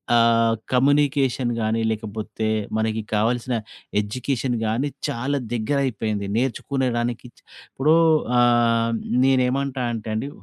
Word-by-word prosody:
ఆహ్, 115 -1 +4 0.2
కమ్యూనికేషన్ 135 -1 +2
గాని, 110 +1 0
లేకపోతే 110 0 -4 0.3
మనకి 110 0 -1
కావాల్సిన 120 +3 0 0.5
ఎడ్యుకేషన్‌ 125 +3 -2
గాని 115 +7 0 0.2
చాలా 135 +5 -2 0.2
దగ్గరైపోయింది. 110 -4 -1
నేర్చుకునేడానికి 125 -2 -1 0.4
ఇప్పుడూ 150 +4 +3 0.4
ఆహ్, 115 -1 +3 0.3
నేనేమంటానంటే 130 -3 0
అండి. 125 +6 -3
120 Hz, 85 wpm, -23 LUFS, 110-130 Hz, 0.5 s, ఆహ్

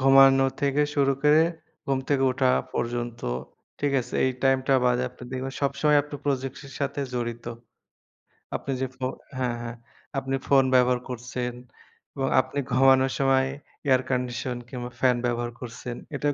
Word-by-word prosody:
ঘুমানো 135 0 +7
থেকে 140 +1 +2
শুরু 140 -1 +3
করে, 150 +2 +6 0.4
ঘুম 135 -1 +1
থেকে 140 -2 +2
ওঠা 130 0 +2 0.2
পর্যন্ত, 120 0 -2 0.6
ঠিক 145 -1 +1
আছে? 120 - -8
এই 130 - +3
টাইমটা 135 0 +3
বাদে 125 0 +3
আপনি 125 - -12
দেখবেন 130 +1 -3
সবসময় 140 +2 +3
আপনি 145 +1 -10
প্রযুক্তির 135 0 -3
সাথে 140 0 -1
জড়িত। 120 -1 -3 1.1
আপনি 135 - -3
যে, 130 - +1
ফো 130 - -3 0.3
হ্যাঁ, 125 -2 0
হ্যাঁ। 115 0 -5 0.4
আপনি 135 0 -2
ফোন 135 -1 +6
ব্যবহার 125 0 +4
করছেন 125 0 -4 0.6
এবং 135 -1 -1
আপনি 130 +2 -5
ঘুমানোর 130 +1 +5
সময় 135 -1 +4 0.4
এয়ার 130 -1 +5
কন্ডিশন 125 0 -1
কিংবা 125 -2 -5
ফ্যান 125 -1 +4
ব্যবহার 120 0 -1
করছেন, 120 0 -6 0.2
এটাও 145 +1 0
130 Hz, 145 wpm, -26 LUFS, 125-135 Hz, 1.1 s, ঘুমানো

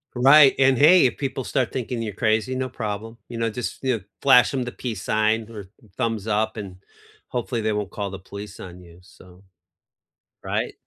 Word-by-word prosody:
Right, 135 +3 +7
and, 135 -1 +4
hey, 165 +5 +6
if 125 - 0
people 135 -1 -3
start 125 -1 -1
thinking 125 -2 -4
you're 110 -2 -4
crazy, 110 +3 0
no 130 0 -2
problem. 110 -1 -6
You 120 - -7
know, 115 0 0
just 125 +4 -6
you 130 -3 +1
know, 100 - -14 0.2
flash 135 -3 +6
them 130 -2 -1
the 125 - -5
peace 110 -5 -6
sign 110 +1 +1
or 105 -3 -8 0.2
th 110 - -23
thumbs 115 -3 -2
up, 110 +1 -1
and 95 -4 -7 0.5
hopefully 120 -1 -3
they 110 0 0
won't 105 -2 -3
call 100 -2 -4
the 95 - -7
police 100 +1 -10
on 90 -1 -10
you, 85 0 -16
so 90 0 -18 1.0
right? - - -2
115 Hz, 200 wpm, -23 LUFS, 105-125 Hz, 1.0 s, Right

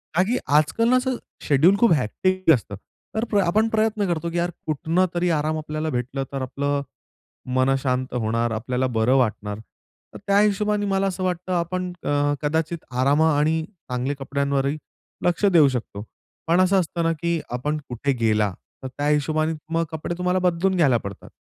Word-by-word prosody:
का 175 - +4
की 250 - +2 0.2
आज-काल 230 +10 +2
ना, 255 - +5 0.4
शेड्युल 155 +7 +4
खूप 235 -3 +5
हेक्टिक 185 - +1
असतं, 110 -6 -2 0.4
तर 220 -1 0
आपण 205 +5 +2
प्रयत्न 215 -2 +1
करतो 170 -1 -1
की 175 - -3
यार, 175 +1 0 0.2
कुठनं 160 +4 +1
तरी 175 +1 +1
आराम 155 +1 -1
आपल्याला 155 0 -3
भेटला, 130 +1 -2
तर 135 - -3
आपलं 140 +2 -1 0.7
मन 130 +1 +3
शांत 130 -1 -1
होणार, 115 0 0
आपल्याला 125 +3 -1
बरं 115 +4 +3
वाटणार. 105 -4 -1 0.5
तर - - -8
त्या 200 0 +4
हिशोबाने 210 0 +1
मला 195 0 +1
असं 185 -1 -3
वाटतं, 180 0 -2
आपण 180 +1 -1
अ, 145 0 +1
कदाचित 160 +2 -1
आराम 135 +4 +2
आणि 160 +1 +2 0.3
चांगल्या 125 +3 -1
कपड्यांवरही 140 +1 0 0.5
लक्ष 175 +3 +2
देऊ 150 -3 +7
शकतो. 115 -5 -5 0.4
पण 170 +3 +4
असं 190 +1 +4
असतं 170 -1 -2
ना, 165 - +2
की 170 +1 -1
आपण 145 +5 -2
कुठे 130 +3 -1
गेला, 105 -3 +2 0.3
तर 130 - -3
त्या 145 0 -1
हिशोबाने 155 +2 +1 0.2
मग 165 0 +1
कपडे 160 +2 -4
तुम्हाला 180 +1 +1
बदलून 180 +1 +1
घ्यायला 140 -8 +4
पडतात. 100 -3 -9
155 Hz, 170 wpm, -23 LUFS, 130-180 Hz, 0.7 s, देऊ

